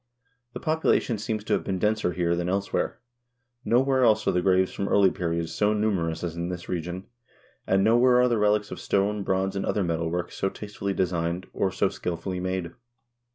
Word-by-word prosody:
The - - -5
population 155 -7 +1
seems 110 0 -3
to - - -1
have - - +1
been 95 - -2
denser 105 -2 0
here 85 -1 +1
than 85 +1 -2
elsewhere. 100 +1 -1 0.7
Nowhere 130 +2 +3
else 110 -2 +4
are - - +4
the 90 - +1
graves 95 0 +2
from 100 - -3
early 100 -2 +4
periods 85 -2 -2
so 105 +1 +2
numerous 90 -7 -1
as 85 -2 -3
in 85 +1 -3
this 90 -1 -6
region, 90 +2 -4 0.6
and 95 +1 +3
no 110 +3 +4
where 125 0 +5
are 125 - +5
the 120 -3 +1
relics 105 0 +2
of - - -6
stone, 100 +1 0
bronze, 95 0 -1
and 95 - -1
other 105 - 0
metal 85 -1 -1
work 90 +1 -3
so 95 - -1
taste 105 +1 -10
fully 100 -1 -1
designed, 85 -1 -1
or 95 - 0
so 95 - +1
skillfully 90 0 -4
made. 95 -2 -3
95 Hz, 200 wpm, -26 LUFS, 90-105 Hz, 0.7 s, where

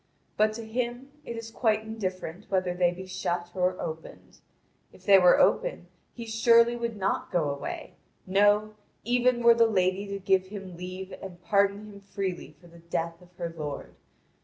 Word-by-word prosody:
But 215 +1 +3
to 230 +1 -7
him 245 +4 -3
it 235 - -5
is 225 0 -7
quite 220 -2 +1
indifferent 190 -4 -5
whether 185 -2 0
they 175 0 +3
be 180 +2 -7
shut 175 -1 -3
or 185 0 0
opened. 160 0 -8 0.5
If - - -19
they 195 -2 +8
were 180 -1 +6
open - - +2 0.3
he 235 - -7
surely 230 +1 +4
would 235 -2 -3
not 195 -1 -1
go 155 -5 +1
away, 140 - -6 0.3
no, 205 +2 +3 0.3
even 245 +1 +2
were 235 0 +8
the 230 0 +4
lady 190 -1 +1
to 200 0 -4
give 190 -1 +1
him 195 -3 -8
leave 185 +2 -7
and 180 -2 -9
pardon 200 +3 +2
him 205 -1 -11
freely 190 -6 -5
for 175 - -20
the 170 0 -15
death 170 0 -4
of 180 - -18
her 170 -2 -5
lord. 150 -3 -6
195 Hz, 175 wpm, -28 LUFS, 180-220 Hz, 0.5 s, they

